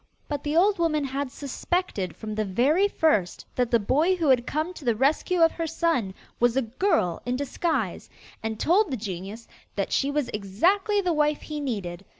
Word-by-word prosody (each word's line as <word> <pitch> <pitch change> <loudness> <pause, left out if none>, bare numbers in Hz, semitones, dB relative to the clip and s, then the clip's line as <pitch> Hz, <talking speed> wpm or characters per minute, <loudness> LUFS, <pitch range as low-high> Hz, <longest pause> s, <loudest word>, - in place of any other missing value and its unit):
But 290 -1 -4
the 300 +2 0
old 390 +2 +4
woman 310 -3 +1
had 275 0 -3
suspected 280 - -3
from 215 -1 -6
the 215 0 -1
very 265 - +2
first 300 - +1
that 250 -2 0
the 235 - +4
boy 295 - +2
who 330 -5 0
had 250 -2 +3
come 310 +4 -2
to 335 - -11
the 235 -3 +1
rescue 305 +8 +1
of 325 - +5
her 330 -1 -3
son 320 - 0 0.2
was 240 +1 +3
a 270 - +3
girl 235 - 0
in 245 0 -1
disguise, 275 - -2 0.3
and 220 -1 -4
told 385 +4 +3
the 260 - -2
genius 200 +2 -6 0.3
that - - -2
she 275 - +1
was 285 -2 -1
exactly 360 - +1
the 360 -3 0
wife 300 -1 +1
he 300 -1 -5
needed. 195 -10 -4
280 Hz, 190 wpm, -26 LUFS, 220-330 Hz, 0.3 s, of